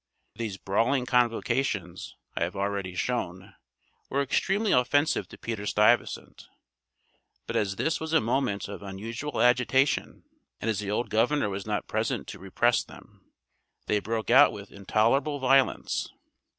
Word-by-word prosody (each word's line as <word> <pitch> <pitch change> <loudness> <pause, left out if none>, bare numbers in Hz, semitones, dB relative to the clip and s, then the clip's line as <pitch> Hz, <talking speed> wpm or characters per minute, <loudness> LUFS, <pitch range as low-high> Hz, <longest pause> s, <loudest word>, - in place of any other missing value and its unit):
These 110 -5 -5
brawling 120 +8 +1
convocations, 120 -6 0 0.2
I - - -3
have - - -1
already 100 -2 -3
shown, 95 -5 -3 0.6
were 140 +1 +1
extremely 195 - 0
offensive 145 +5 +2
to - - -13
Peter 110 -3 -5
Stuyvesant; 105 +4 +1 1.0
but - - -5
as 100 -2 0
this 160 +10 -1
was 160 0 -5
a 160 - +5
moment 120 -3 -1
of 100 0 -8
unusual 110 +9 -5
agitation, 125 +3 +2 0.4
and 115 - -1
as 105 - -2
the 100 -1 -4
old 105 +4 -2
governor 115 +2 +2
was 100 +1 -5
not 105 -1 -2
present 110 +1 -2
to 100 - -8
repress 115 +6 +1
them, - - -17 0.5
they 105 - +1
broke 110 +1 -3
out 145 +2 +7
with 100 -1 -10
intolerable 115 +9 +1
violence. 135 0 +2
115 Hz, 140 wpm, -27 LUFS, 100-135 Hz, 1.0 s, out